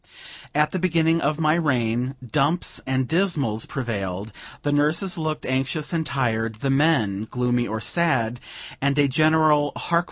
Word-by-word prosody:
At 150 +1 +2
the 185 - -2
beginning 165 -2 +2
of 150 +1 0
my 155 -1 +3
reign, 130 -5 0
dumps 150 +7 0
and 130 -1 0
dismals 155 - 0
prevailed; 100 -5 -4 0.3
the 145 - 0
nurses 155 +6 +2
looked 155 -2 -3
anxious 135 +4 -2
and 165 -1 0
tired, 115 -6 -1
the 135 - 0
men 130 -9 +1
gloomy 125 -1 0
or 110 +1 -3
sad; 125 -5 0 0.4
and 140 +1 +1
a 145 -1 +4
general 155 0 +3
"Hark! 170 0 +1
140 Hz, 150 wpm, -23 LUFS, 120-160 Hz, 0.4 s, a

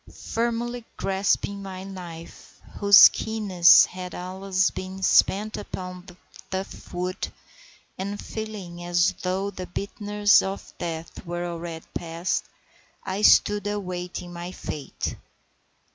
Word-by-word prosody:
Firmly 235 +1 -1
grasping 200 +1 0
my 190 -1 -7
knife, 175 -4 -10 0.2
whose 200 -1 +10
keenness 200 -6 +5
had, 180 0 -7
alas, 190 +1 0
been 190 +1 -7
spent 210 +3 +3
upon 180 -2 -7
the 180 -2 -13 0.3
tough 190 +1 -6
wood, 180 +1 -3 0.7
and 200 +2 -4
feeling 200 -6 -6
as 175 0 +2
though 190 +2 -1
the 185 -2 -7
bitterness 205 +2 +2
of 195 +1 -6
death 165 -1 -5
were 175 0 -4
already 170 -1 -6
past, 170 +2 -2 0.6
I 190 +2 -3
stood 205 -1 +5
awaiting 180 -3 -4
my 175 +1 -6
fate. 150 -5 -5
185 Hz, 115 wpm, -25 LUFS, 175-200 Hz, 0.7 s, whose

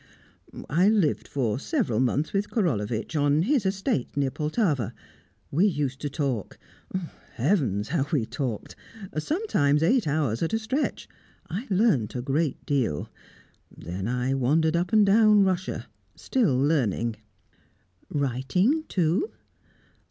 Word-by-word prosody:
"I 180 +7 +3
lived 205 -9 +1
for 125 -4 -1
several 205 - 0
months 130 +4 0
with 200 +1 0
Korolevitch, 120 - -1
on 145 +1 +3
his 245 -2 +2
estate 190 - -1
near 140 -2 +1
Poltava. 150 - -1 0.6
We 175 +9 +4
used 145 -7 -2
to 145 - -2
talk 135 - -3 0.8
heavens! 120 - 0
how 145 -4 0
we 140 -9 +1
talked! 125 -4 -4 0.4
Sometimes 155 - +1
eight 225 +3 +3
hours 140 -6 0
at 165 +6 -1
a - - +3
stretch. 245 +7 -2 0.4
I 210 +10 -4
learnt 185 - +2
a 125 - -2
great 140 +2 -1
deal. 125 - -1 0.6
Then 90 +5 -6
I 125 +2 0
wandered 155 +5 +2
up 175 +4 0
and 215 -2 +5
down 210 0 +5
Russia, 185 0 -1 0.3
still 220 - +1
learning." 120 - +1 0.9
"Writing, 145 - +1
too?" 180 - +1
150 Hz, 125 wpm, -26 LUFS, 130-195 Hz, 0.9 s, and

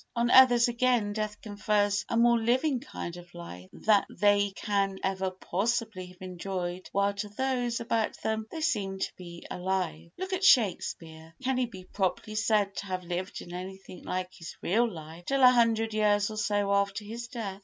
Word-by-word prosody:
On 235 +1 +1
others, 245 -2 +7
again, 240 -3 +1
death 215 -1 -3
confers 205 -1 0
a 230 - 0
more 235 0 +5
living 255 +4 +1
kind 175 - -7
of 175 0 -13
life 95 - -9
than 210 -2 +3
they 205 +1 +3
can 200 -2 0
ever 190 0 0
possibly 200 +1 -2
have 180 0 -17
enjoyed 185 0 -5
while 200 0 +1
to 200 +1 -5
those 245 +1 -1
about 230 -2 -1
them 220 0 -1
they 320 - -6
seemed 200 -11 -1
to - - -2
be 170 -2 -10
alive. 180 -3 -2
Look 375 +1 -4
at 375 +1 -1
Shakespeare; 165 - +2
can 260 0 +1
he 250 - +1
be 190 -5 -11
properly 190 +3 -2
said 215 -2 +1
to 200 - -4
have 185 -1 -3
lived 180 +2 -4
in 175 - -10
anything 185 +1 -8
like 185 0 -3
his 165 - -9
real 230 +5 +2
life 165 0 -10
till 275 +3 +1
a 250 - +10
hundred 225 -2 +2
years 210 -1 +2
or 215 - -7
so 205 -1 +1
after 200 +1 0
his 235 +3 -6
death? 210 -5 -5
205 Hz, 185 wpm, -29 LUFS, 185-230 Hz, -, a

